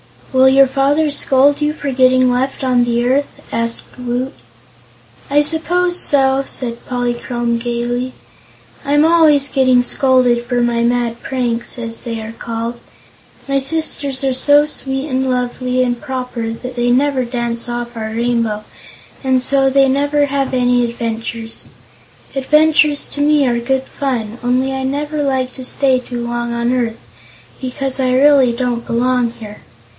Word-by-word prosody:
"Will 260 Hz, 0 st, +6 dB
your 270 Hz, +1 st, +6 dB
father 285 Hz, +3 st, +1 dB
scold 280 Hz, +1 st, +2 dB
you 300 Hz, 0 st, +1 dB
for 285 Hz, -3 st, -4 dB
getting 255 Hz, 0 st, +4 dB
left 260 Hz, +2 st, -2 dB
on 250 Hz, -2 st, +2 dB
the 240 Hz, 0 st, 0 dB
earth?" 275 Hz, +3 st, -1 dB
asked 230 Hz, +2 st, -3 dB
Woot. 250 Hz, +2 st, -3 dB, 1.0 s
"I 290 Hz, +1 st, +4 dB
suppose 350 Hz, +3 st, 0 dB
so," 270 Hz, -1 st, +3 dB
said 235 Hz, -2 st, -4 dB
Polychrome 240 Hz, -1 st, -2 dB
gaily; 240 Hz, +1 st, -3 dB, 0.7 s
"I'm 290 Hz, +2 st, +3 dB
always 310 Hz, -4 st, +4 dB
getting 255 Hz, -2 st, +3 dB
scolded 250 Hz, -2 st, +2 dB
for 245 Hz, 0 st, 0 dB
my 235 Hz, -1 st, +1 dB
mad 235 Hz, -1 st, 0 dB
pranks, 240 Hz, -3 st, -3 dB
as 230 Hz, -1 st, -4 dB
they 230 Hz, -2 st, -5 dB
are 220 Hz, +1 st, -7 dB
called. 230 Hz, +1 st, -5 dB, 0.7 s
My 275 Hz, 0 st, +1 dB
sisters 280 Hz, -2 st, -1 dB
are 265 Hz, -1 st, +1 dB
so 290 Hz, +3 st, +4 dB
sweet 270 Hz, -1 st, -3 dB
and 260 Hz, 0 st, 0 dB
lovely 250 Hz, 0 st, -1 dB
and 245 Hz, -1 st, -2 dB
proper 250 Hz, -5 st, -4 dB
that 250 Hz, +2 st, -8 dB
they 240 Hz, 0 st, +1 dB
never 265 Hz, 0 st, +1 dB
dance 235 Hz, -1 st, -3 dB
off 240 Hz, 0 st, -5 dB
our 220 Hz, -1 st, -4 dB
Rainbow, 230 Hz, -2 st, -1 dB, 0.6 s
and 260 Hz, -1 st, +3 dB
so 270 Hz, +1 st, +2 dB
they 270 Hz, 0 st, +4 dB
never 285 Hz, +2 st, +1 dB
have 275 Hz, -1 st, -2 dB
any 245 Hz, -1 st, +2 dB
adventures. 230 Hz, -1 st, -5 dB, 0.7 s
Adventures 300 Hz, +1 st, +3 dB
to 290 Hz, -, -3 dB
me 295 Hz, -1 st, +3 dB
are 240 Hz, -2 st, +1 dB
good 265 Hz, +2 st, -1 dB
fun, 245 Hz, -5 st, -4 dB
only 255 Hz, +2 st, 0 dB
I 265 Hz, 0 st, -3 dB
never 295 Hz, +3 st, -2 dB
like 265 Hz, -2 st, -1 dB
to 260 Hz, -, -7 dB
stay 260 Hz, 0 st, +2 dB
too 245 Hz, -1 st, -6 dB
long 240 Hz, 0 st, -3 dB
on 235 Hz, +1 st, 0 dB
earth, 235 Hz, -3 st, -1 dB, 0.6 s
because 260 Hz, +1 st, -2 dB
I 255 Hz, -1 st, +1 dB
really 270 Hz, -2 st, +5 dB
don't 240 Hz, -1 st, -2 dB
belong 245 Hz, 0 st, +1 dB
here. 210 Hz, -3 st, -10 dB
255 Hz, 150 wpm, -16 LUFS, 240-275 Hz, 1.0 s, Will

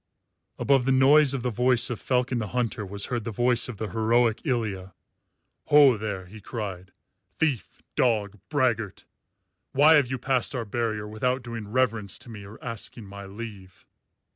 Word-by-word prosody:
Above 135 Hz, -3 st, +2 dB
the 135 Hz, -, +2 dB
noise 135 Hz, +2 st, +5 dB
of 125 Hz, -, -4 dB
the 125 Hz, -, 0 dB
voice 125 Hz, +2 st, +2 dB
of 120 Hz, -, -5 dB
Falcon 125 Hz, -1 st, 0 dB
the 105 Hz, -, -3 dB
Hunter 120 Hz, -2 st, -1 dB
was 100 Hz, +1 st, -2 dB
heard 120 Hz, -3 st, -3 dB
the 115 Hz, -, -4 dB
voice 120 Hz, +3 st, +1 dB
of 120 Hz, -, -7 dB
the 110 Hz, +1 st, -4 dB
heroic 115 Hz, 0 st, +2 dB
Ilya. 105 Hz, -, -2 dB, 0.7 s
"Ho 145 Hz, -4 st, +6 dB
there!" 100 Hz, -3 st, -4 dB
he 105 Hz, +4 st, -12 dB
cried, 95 Hz, -4 st, -6 dB, 0.5 s
"Thief, 140 Hz, -, -2 dB
dog, 105 Hz, -4 st, +1 dB
braggart! 120 Hz, -, 0 dB, 0.7 s
Why 150 Hz, +4 st, +6 dB
have 140 Hz, -4 st, +3 dB
you 130 Hz, -, -2 dB
passed 130 Hz, +1 st, 0 dB
our 120 Hz, -2 st, -2 dB
barrier 110 Hz, -1 st, -2 dB
without 125 Hz, +4 st, -1 dB
doing 115 Hz, -3 st, -6 dB
reverence 115 Hz, -4 st, 0 dB
to -, -, -11 dB
me 105 Hz, -3 st, -9 dB
or 100 Hz, +2 st, -11 dB
asking 115 Hz, -1 st, -5 dB
my 100 Hz, 0 st, -9 dB
leave?" 100 Hz, -3 st, -10 dB
115 Hz, 165 wpm, -26 LUFS, 105-125 Hz, 0.7 s, Ho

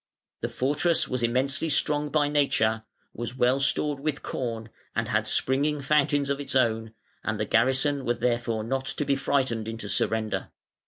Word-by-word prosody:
The -, -, -3 dB
fortress 150 Hz, +6 st, +1 dB
was 125 Hz, -1 st, -2 dB
immensely 135 Hz, +6 st, +1 dB
strong 150 Hz, +1 st, +1 dB
by 145 Hz, -1 st, +2 dB
nature, 115 Hz, -7 st, +1 dB, 0.3 s
was 120 Hz, +1 st, -5 dB
well 125 Hz, +2 st, +3 dB
stored 140 Hz, +1 st, +2 dB
with 150 Hz, 0 st, -3 dB
corn, 115 Hz, -3 st, -4 dB, 0.3 s
and -, -, -1 dB
had -, -, +1 dB
springing 145 Hz, +3 st, +1 dB
fountains 145 Hz, 0 st, +2 dB
of 140 Hz, -, -1 dB
its 140 Hz, -1 st, -4 dB
own, 115 Hz, -3 st, +1 dB, 0.3 s
and 110 Hz, -1 st, -2 dB
the 105 Hz, -, 0 dB
garrison 130 Hz, +5 st, +2 dB
were 120 Hz, -1 st, 0 dB
therefore 120 Hz, -3 st, -1 dB
not 135 Hz, +3 st, -2 dB
to 150 Hz, -, -2 dB
be 140 Hz, -, +2 dB
frightened 130 Hz, -5 st, 0 dB
into 115 Hz, -2 st, -5 dB
surrender. 110 Hz, +1 st, -1 dB
130 Hz, 165 wpm, -27 LUFS, 115-145 Hz, 0.3 s, well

